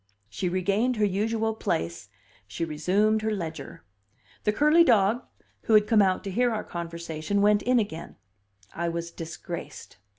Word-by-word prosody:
She 175 - -2
regained 200 +7 +1
her 215 -1 +2
usual 220 +3 0
place, 85 - -3 0.4
she 105 +12 -3
resumed 195 +8 +1
her 220 - -1
ledger; 160 - -5 0.6
the 210 - +4
curly 300 +8 +5
dog, 225 -4 +3 0.4
who 225 - +4
had 210 -1 +6
come 220 -1 +4
out 190 -2 +2
to 195 - -5
hear 245 +5 +2
our 220 - -2
conversation, 170 +2 -4
went 205 0 +4
in 250 +3 +2
again; 200 -8 -3 0.6
I 170 0 -2
was 170 0 -4
disgraced. 165 - -8
200 Hz, 155 wpm, -26 LUFS, 170-220 Hz, 0.6 s, had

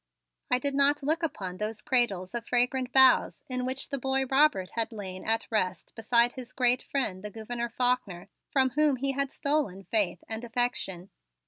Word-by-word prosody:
I 250 - +4
did 280 +2 -1
not 280 +1 +3
look 315 +4 +1
upon 190 - -4
those 215 +1 -3
cradles 200 -8 +1
of 235 -1 -5
fragrant 250 +1 +1
boughs 265 -1 +5
in 255 -1 -3
which 260 +1 -3
the 275 -1 -3
boy 265 +1 0
Robert 265 -9 +2
had 230 +1 -2
lain 190 -4 -7
at 225 +1 0
rest 185 -4 -2
beside 235 +2 +3
his 255 -1 -9
great 250 -1 +2
friend, 205 -9 -2
the 210 - -5
Gouverneur 235 +3 -5
Faulkner, 240 -7 -1 0.2
from 265 -2 +2
whom 300 0 +3
he 275 +2 -1
had 275 0 -1
stolen 280 -11 -1
faith 200 -5 0
and 220 +1 -5
affection. 230 -7 -2
245 Hz, 180 wpm, -28 LUFS, 210-265 Hz, 0.2 s, boughs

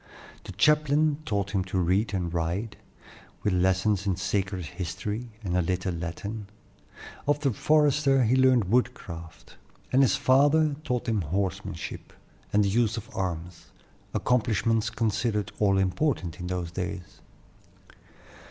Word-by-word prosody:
The - - -7
chaplain 150 0 +3
taught 100 -1 -1
him 95 -2 0
to 95 0 -3
read 95 +4 +1
and 90 -4 -2
write, 90 +6 -2 0.7
with 105 - +1
lessons 95 +2 +1
in 95 - +2
sacred 95 0 -2
history, 95 +8 -5
and 90 -3 -2
a 90 - +3
little 90 +1 -1
Latin; 100 +6 -5 0.8
of 145 0 +2
the 135 -5 +1
forester 145 0 +3
he 120 +3 +3
learned 130 -3 +5
woodcraft; 95 -7 -3 0.4
and 130 - +5
his 135 - +4
father 145 +3 +4
taught 125 -3 -2
him 110 -3 +1
horsemanship 95 +4 -4 0.4
and 105 0 +3
the - - +1
use 115 +2 +1
of 110 -1 -8
arms, 90 -2 -4 0.4
accomplishments 115 -2 +1
considered 110 -2 -1
all 100 -2 +3
important 95 - 0
in 90 - -5
those 90 -2 -3
days. 95 0 -6
100 Hz, 135 wpm, -27 LUFS, 90-125 Hz, 0.8 s, learned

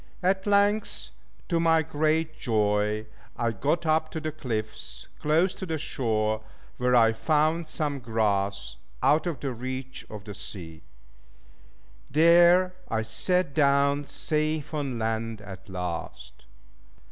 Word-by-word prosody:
At 190 +2 +1
length, 205 +1 +2 0.4
to 170 -2 +1
my 165 -1 +4
great 155 +1 0
joy, 105 -4 +1 0.3
I 115 -1 +1
got 145 - -1
up 155 0 +2
to 160 - -4
the 155 0 -3
cliffs 110 -7 -5
close 165 +5 +2
to 190 - -7
the 160 -1 -1
shore, 110 -6 -1 0.4
where 125 0 +2
I 115 -2 +5
found 155 +6 +1
some 150 -2 -2
grass, 100 - 0 0.3
out 155 +4 +4
of 155 -7 -3
the 135 -3 -2
reach 130 +2 -5
of 105 -2 -8
the 105 - -8
sea. 80 -5 -7 1.3
There, 175 +4 +6 0.2
I 110 -1 0
sat 170 +9 0
down, 140 -1 +3
safe 155 0 -1
on 140 -5 -2
land 115 0 -2
at 100 0 -11
last. 90 -8 -6
140 Hz, 130 wpm, -27 LUFS, 110-160 Hz, 1.3 s, There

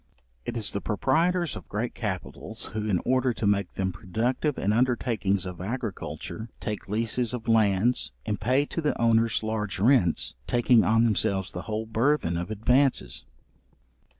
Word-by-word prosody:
It 120 - -3
is 110 - 0
the 100 - -3
proprietors 165 - +1
of - - -10
great 110 +4 -2
capitals, 100 -6 -5
who, 110 0 -2
in 90 -4 +2
order 130 -1 +2
to - - -3
make 100 -2 +1
them 95 -1 -1
productive 120 - -1
in 100 +2 +1
undertakings 115 -5 +1
of 90 -1 -6
agriculture, 110 - -5
take 105 -3 -5
leases 115 +3 0
of 120 -1 -8
lands, 110 +1 +3
and 105 -2 -2
pay 130 +7 +2
to 165 - -4
the 150 - -1
owners 115 -1 +3
large 110 -2 -2
rents, 110 - +3
taking 120 -1 +4
on 115 +1 +3
themselves 100 -4 +1
the 90 - -5
whole 110 +1 -2
burthen 115 - +1
of 85 +1 -3
advances. 125 +6 +1
110 Hz, 155 wpm, -27 LUFS, 100-125 Hz, -, taking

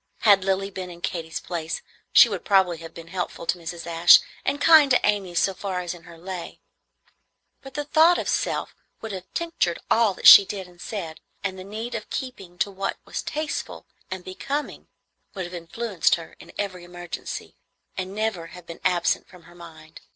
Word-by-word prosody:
Had 200 -3 +6
Lilly 195 +1 0
been 185 -1 -6
in 170 -1 -11
Katy's 165 -2 -4
place, 165 -2 -4 0.3
she - - +9
would - - -4
probably 190 -5 +3
have 165 0 -9
been 165 0 -10
helpful 180 -2 -4
to 180 - 0
Mrs. 170 0 -7
Ashe 170 0 +7 0.2
and 280 +1 -1
kind 310 -1 +7
to 250 - +5
Amy 200 -4 0
so 195 +3 +2
far 190 -1 -3
as 175 -1 -4
in 170 -2 -14
her 170 -1 -13
lay; 180 0 -7 1.0
but 270 -1 -12
the 295 - -1
thought 320 +4 +5
of - - -3
self - - -1 0.3
would 225 - -6
have 185 -2 -8
tinctured 330 - 0
all 220 -4 +4
that - - -9
she - - +12
did 195 -1 -6
and 175 -1 -18
said, 170 -7 -6 0.2
and 190 -1 -3
the - - -7
need 220 +5 -6
of - - -5
keeping 195 -9 -6
to 200 - 0
what 195 0 -3
was - - -4
tasteful 310 +1 -4 0.2
and 190 -2 -6
becoming 275 +10 -4 0.5
would 190 -2 -3
have 175 - -9
influenced 180 +3 0
her 165 -1 -11
in - - -13
every 185 -3 -4
emergency, 175 0 -7 0.4
and 190 +1 -5
never 215 -6 -2
have 180 0 -12
been 170 0 -10
absent 175 -2 +1
from 180 -2 -16
her 175 - -17
mind. 160 -2 -13
185 Hz, 195 wpm, -24 LUFS, 170-205 Hz, 1.0 s, she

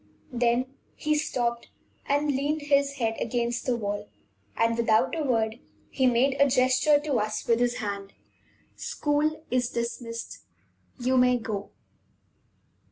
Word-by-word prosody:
Then 240 +1 +2 0.3
he 305 - 0
stopped 240 -6 -1 0.4
and 285 +1 +2
leaned 290 +3 -1
his 280 -1 +2
head 225 -4 -1
against 235 +1 -1
the 250 - +2
wall, 205 -1 -4 0.5
and, 230 0 +2
without 230 +4 +2
a 325 - -2
word, 225 -3 0 0.3
he 260 -1 +2
made 255 +3 +3
a 280 - +7
gesture 255 +3 +4
to 290 -5 0
us 215 0 -2
with 230 0 +3
his 245 0 +1
hand; 200 -3 -5 0.6
"School 310 +2 -1
is 245 -1 +1
dismissed 235 -1 -5 0.6
you 255 +1 +1
may 250 0 +5
go." 210 -3 -5
245 Hz, 135 wpm, -27 LUFS, 230-280 Hz, 0.6 s, a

